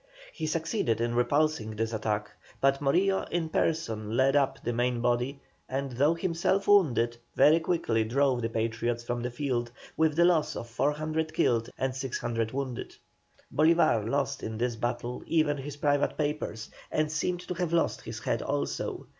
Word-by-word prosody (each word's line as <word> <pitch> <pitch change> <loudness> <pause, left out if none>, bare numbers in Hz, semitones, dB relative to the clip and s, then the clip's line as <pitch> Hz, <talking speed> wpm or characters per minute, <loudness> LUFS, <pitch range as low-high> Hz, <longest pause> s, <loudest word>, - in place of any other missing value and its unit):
He 160 - -3
succeeded 160 - 0
in 120 0 0
repulsing 125 -2 +1
this 115 +1 -2
attack, 105 -1 -2 0.3
but 135 0 +2
Morillo, 185 +8 +2
in 165 -2 -1
person, 115 -11 -1
led 135 +2 +4
up 135 -1 +2
the 120 - -1
main 120 +1 0
body, 120 +3 0 0.3
and 135 +1 -2
though 145 +7 +2
himself 175 +3 0
wounded, 120 - +4 0.2
very 155 +3 +6
quickly 160 -10 0
drove 130 +2 +1
the 115 - -1
Patriots 115 +1 -1
from 120 0 -3
the 120 - -2
field, 120 -2 -2 0.3
with 160 -1 +2
the 170 +1 +5
loss 170 -4 +2
of 115 - -5
400 155 +5 -1
killed 115 -1 +2
and 130 -1 -1
600 120 -4 -2
wounded. 130 -2 -4 0.6
Bolívar 155 -9 +4
lost 140 +1 -1
in 110 0 -4
this 120 0 -1
battle 120 +1 -3
even 155 -3 +2
his 145 +1 -7
private 145 -1 +1
papers, 145 -7 -3 0.2
and 155 0 0
seemed 175 +3 -1
to 180 - -5
have 175 -2 -2
lost 170 -1 +1
his - - -7
head - - -1
also. 70 0 -3
135 Hz, 165 wpm, -29 LUFS, 120-155 Hz, 0.6 s, very